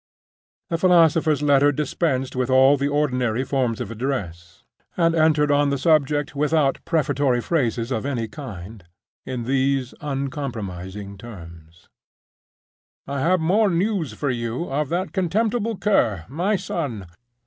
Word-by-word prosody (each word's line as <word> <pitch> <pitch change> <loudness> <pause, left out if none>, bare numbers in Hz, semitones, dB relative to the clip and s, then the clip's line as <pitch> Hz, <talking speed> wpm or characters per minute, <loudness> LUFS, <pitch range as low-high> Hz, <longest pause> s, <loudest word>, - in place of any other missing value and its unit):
The 165 - 0
philosopher's 165 -4 +4
letter 145 0 +4
dispensed 135 -2 -1
with 130 0 -1
all 130 +2 +6
the 140 0 -1
ordinary 130 -5 0
forms 130 -4 -1
of - - -5
address, 100 -7 -5 0.3
and 165 -2 +3
entered 155 -2 +3
on 145 0 +3
the 140 - 0
subject 145 -1 +1
without 150 -1 +1
prefatory 145 -5 +1
phrases 120 -4 -1
of 110 - -1
any 125 -5 -2
kind, 105 - -9 0.4
in 125 -2 -3
these 130 0 0
uncompromising 105 -9 -5
terms: 85 -6 -12 1.2
"I 140 0 -4
have 175 +5 +2
more 200 +6 +3
news 180 - -1
for 140 +4 -2
you 120 +6 -3
of 145 0 -1
that 180 +3 -2
contemptible 215 +4 0
cur, 115 - +1
my 175 - 0
son. 145 - -4
140 Hz, 130 wpm, -22 LUFS, 120-160 Hz, 1.2 s, all